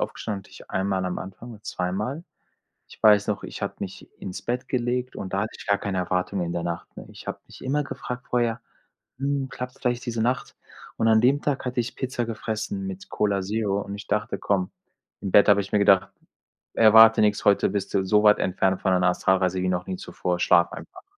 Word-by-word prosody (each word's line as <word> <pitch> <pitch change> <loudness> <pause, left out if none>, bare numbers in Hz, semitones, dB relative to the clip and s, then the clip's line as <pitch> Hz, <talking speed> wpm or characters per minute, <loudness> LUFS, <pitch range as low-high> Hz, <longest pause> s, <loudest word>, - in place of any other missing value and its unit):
aufgestanden, 100 -2 -3
hatte - - -21
ich - - -14
einmal 95 -1 -1
am 90 - -2
Anfang 95 +6 -9
oder 105 -1 -14
zweimal. 105 - -3 0.7
Ich - - -16
weiß 105 -2 +6
noch, 105 -2 -2
ich - - -6
habe - - -2
mich - - -7
ins 90 - -7
Bett 125 +1 -2
gelegt 125 0 -1
und 95 - -6
da 95 - +1
hatte 110 - -2
ich - - -11
gar 100 -1 +2
keine 100 -2 -3
Erwartungen 90 0 -1
in 85 - -3
der 85 - -2
Nacht, 85 0 -5
ne? - - -10
Ich - - -13
habe - - -4
mich - - -13
immer 145 +3 0
gefragt 125 -3 -7
vorher: 120 -1 0 0.6
„Hm, 140 0 -1
klappt's 125 0 -7
vielleicht 125 0 -1
diese 115 -1 -1
Nacht?“ 125 +2 -1 0.4
Und 115 - +2
an 110 0 +5
dem 135 +4 +4
Tag 140 -3 -1
hatte 125 0 -2
ich 120 - -2
Pizza 125 -2 -2
gefressen 115 - -4
mit 190 +1 -8
Cola 100 -2 0
Zero 100 0 -1
und 100 - -7
ich 100 - -8
dachte: 105 +1 -1
„Komm“ 95 -3 0 0.5
im 100 - -3
Bett 100 - +6
habe 100 -1 +5
ich 100 - -9
mir - - +3
gedacht: 95 -2 +4 0.6
„Erwarte 110 0 +7
nix, 105 -1 +2
heute 100 -1 +4
bist 100 -1 -3
du 95 - +3
so 105 +2 +4
weit 105 -1 +6
entfernt 95 0 0
von 95 - +2
deiner 90 -1 +3
Astralreise 95 0 +1
wie 95 - +1
noch 90 -1 -2
nie 95 - -3
zuvor, 90 0 -3
schlaf 85 0 +4
einfach.“ 370 0 -10
105 Hz, 220 wpm, -25 LUFS, 95-120 Hz, 0.7 s, Erwarte